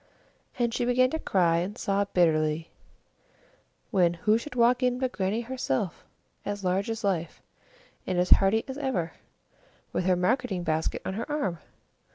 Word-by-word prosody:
And 235 Hz, -2 st, 0 dB
she 245 Hz, -, 0 dB
began 255 Hz, +1 st, +3 dB
to 320 Hz, -, -2 dB
cry 175 Hz, -, +2 dB
and 190 Hz, +6 st, -3 dB
sob 200 Hz, -2 st, -1 dB
bitterly 160 Hz, -2 st, +2 dB, 1.2 s
when, 175 Hz, -5 st, +3 dB
who 210 Hz, +6 st, +2 dB
should 270 Hz, +2 st, -9 dB
walk 245 Hz, +1 st, +4 dB
in 250 Hz, -1 st, +2 dB
but 260 Hz, -1 st, -1 dB
Grannie 200 Hz, +2 st, -1 dB
herself, 215 Hz, -, -2 dB, 0.4 s
as 205 Hz, 0 st, -4 dB
large 190 Hz, +3 st, 0 dB
as 225 Hz, 0 st, -4 dB
life, 175 Hz, -5 st, -1 dB, 0.7 s
and 185 Hz, -, -1 dB
as 180 Hz, +1 st, +1 dB
hearty 200 Hz, +3 st, +5 dB
as 265 Hz, +1 st, -6 dB
ever, 195 Hz, -, -1 dB, 0.8 s
with 180 Hz, -, -1 dB
her 185 Hz, -1 st, +4 dB
marketing 195 Hz, 0 st, 0 dB
basket 160 Hz, -1 st, -1 dB
on 190 Hz, -, -2 dB
her 230 Hz, +8 st, -4 dB
arm! 195 Hz, -, -1 dB
200 Hz, 160 wpm, -27 LUFS, 175-245 Hz, 1.2 s, hearty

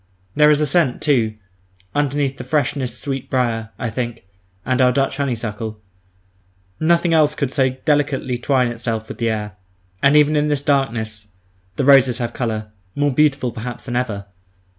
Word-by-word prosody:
There 150 Hz, 0 st, +6 dB
is 150 Hz, -1 st, +4 dB
a -, -, +3 dB
scent, 145 Hz, -3 st, +1 dB
too, 115 Hz, -7 st, +1 dB, 0.6 s
underneath 140 Hz, -2 st, 0 dB
the -, -, -5 dB
freshness 130 Hz, -3 st, -1 dB
sweet 135 Hz, -3 st, -4 dB
brier, 115 Hz, -4 st, 0 dB
I 115 Hz, -, -3 dB
think, 120 Hz, -1 st, -4 dB, 0.4 s
and 130 Hz, 0 st, +1 dB
our 125 Hz, -1 st, +5 dB
Dutch 135 Hz, +1 st, 0 dB
honeysuckle; 115 Hz, -5 st, -3 dB, 1.0 s
nothing 170 Hz, +1 st, +2 dB
else 150 Hz, -2 st, +4 dB
could 140 Hz, -4 st, -2 dB
so 130 Hz, -3 st, +3 dB
delicately 135 Hz, -2 st, 0 dB
twine 125 Hz, -1 st, +2 dB
itself 115 Hz, -2 st, -4 dB
with -, -, -8 dB
air. 105 Hz, -3 st, -2 dB, 0.4 s
And 140 Hz, +2 st, +5 dB
even 150 Hz, +1 st, +4 dB
in 150 Hz, 0 st, +2 dB
this 145 Hz, -2 st, -1 dB
darkness 115 Hz, -7 st, -1 dB, 0.5 s
the 135 Hz, -, -1 dB
roses 135 Hz, -3 st, +6 dB
have 120 Hz, -2 st, -3 dB
colour, 110 Hz, -3 st, -3 dB, 0.2 s
more 145 Hz, -1 st, +1 dB
beautiful 140 Hz, -3 st, +2 dB
perhaps 120 Hz, +2 st, -7 dB
than 120 Hz, -2 st, -4 dB
ever. 110 Hz, -5 st, -2 dB
130 Hz, 160 wpm, -20 LUFS, 115-145 Hz, 1.0 s, There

